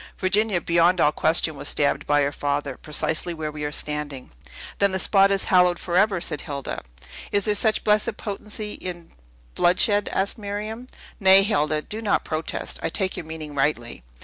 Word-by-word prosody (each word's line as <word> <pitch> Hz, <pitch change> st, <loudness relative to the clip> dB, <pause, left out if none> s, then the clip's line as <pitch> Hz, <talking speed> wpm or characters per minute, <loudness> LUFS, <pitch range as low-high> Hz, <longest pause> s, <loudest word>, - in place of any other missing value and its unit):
Virginia, 200 Hz, 0 st, +1 dB
beyond 170 Hz, +2 st, +2 dB
all 150 Hz, -, +4 dB
question, 160 Hz, 0 st, +1 dB
was 140 Hz, -, -2 dB
stabbed 145 Hz, -1 st, 0 dB
by 145 Hz, 0 st, +3 dB
her 140 Hz, -, 0 dB
father, 145 Hz, -1 st, -2 dB
precisely 160 Hz, +3 st, -1 dB
where 155 Hz, -1 st, -4 dB
we 150 Hz, 0 st, -7 dB
are 145 Hz, -, -2 dB
standing." 150 Hz, -3 st, -4 dB, 0.5 s
"Then 200 Hz, -1 st, +3 dB
the -, -, +1 dB
spot 195 Hz, +1 st, +4 dB
is 195 Hz, -1 st, +2 dB
hallowed 180 Hz, -1 st, +4 dB
forever!" 190 Hz, +3 st, +1 dB
said 150 Hz, -4 st, -3 dB
Hilda. 140 Hz, -2 st, -5 dB, 0.5 s
"Is 200 Hz, -1 st, +2 dB
there 210 Hz, -, +3 dB
such 215 Hz, +1 st, +1 dB
blessed 215 Hz, +2 st, +1 dB
potency 210 Hz, +1 st, -4 dB
in 175 Hz, -2 st, -7 dB, 0.4 s
bloodshed?" 200 Hz, -, +2 dB
asked 195 Hz, +4 st, -1 dB
Miriam. 215 Hz, +4 st, -5 dB, 0.3 s
"Nay, 190 Hz, -1 st, +7 dB
Hilda, 155 Hz, -6 st, 0 dB
do 220 Hz, +1 st, -5 dB
not 210 Hz, -2 st, 0 dB
protest! 155 Hz, 0 st, -4 dB
I 165 Hz, -, -1 dB
take 185 Hz, +3 st, -1 dB
your 160 Hz, -, -7 dB
meaning 155 Hz, -2 st, -7 dB
rightly." 135 Hz, -, -1 dB
175 Hz, 175 wpm, -23 LUFS, 150-200 Hz, 0.5 s, Nay